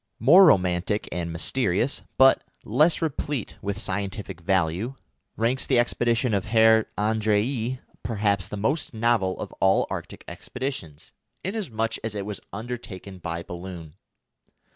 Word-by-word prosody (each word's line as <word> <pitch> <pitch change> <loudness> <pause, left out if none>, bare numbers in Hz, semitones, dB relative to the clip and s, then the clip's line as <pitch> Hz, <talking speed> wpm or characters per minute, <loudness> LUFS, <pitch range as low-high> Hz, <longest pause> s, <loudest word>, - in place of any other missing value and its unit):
More 175 +11 +8
romantic 90 - +2
and 85 -1 -3
mysterious, 100 - 0 0.2
but 135 0 +6 0.2
less 160 +2 +2
replete 145 -5 -2
with 100 0 -3
scientific 95 -2 -4
value, 95 +6 0 0.4
ranks 120 +4 0
the 130 - +3
expedition 120 0 +1
of 100 -2 0
Herr 110 0 +5
Andrée, 110 +4 +1 0.2
perhaps 100 -4 0
the 105 - -6
most 130 +5 -1
novel 110 -5 +1
of - - -6
all 95 +1 +4
Arctic - - -6
expeditions, 125 - -6 0.3
inasmuch 145 - -2
as 110 -1 -2
it 100 -1 -3
was 105 -1 -5
undertaken 100 -4 -7
by 85 0 -4
balloon. 85 -3 -8
105 Hz, 125 wpm, -25 LUFS, 95-120 Hz, 0.4 s, More